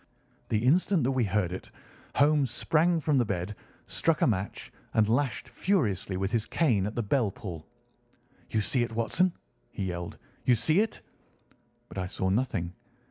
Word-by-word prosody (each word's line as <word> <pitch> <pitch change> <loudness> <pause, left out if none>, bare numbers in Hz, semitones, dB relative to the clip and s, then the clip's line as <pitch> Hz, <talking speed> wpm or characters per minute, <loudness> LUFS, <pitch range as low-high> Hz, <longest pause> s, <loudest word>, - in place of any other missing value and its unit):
The 110 - +2
instant 170 +3 +3
that 130 - +2
we 130 -3 +2
heard 100 -3 0
it, 95 - -7 0.5
Holmes 145 -2 +4
sprang 165 +8 +2
from 145 -3 +2
the - - +4
bed, 100 0 -3 0.3
struck 165 -2 +1
a - - +7
match, 100 -4 -2 0.2
and 110 -1 +4
lashed 125 +3 0
furiously 105 - 0
with 95 +1 -1
his 115 -2 0
cane 115 - +2
at 105 - -6
the 120 - 0
bell 110 +1 +2
pull. 90 -6 -8 0.8
"You 110 - +1
see 125 +4 +1
it, 120 -1 -1
Watson?" 115 +11 +2 0.4
he 95 - -4
yelled. 85 -1 -4 0.3
"You 125 -1 +5
see 155 - +3
it?" 220 0 0 0.9
But - - -6
I 95 - -2
saw 95 0 -1
nothing. 95 -5 0
115 Hz, 170 wpm, -29 LUFS, 95-145 Hz, 0.9 s, a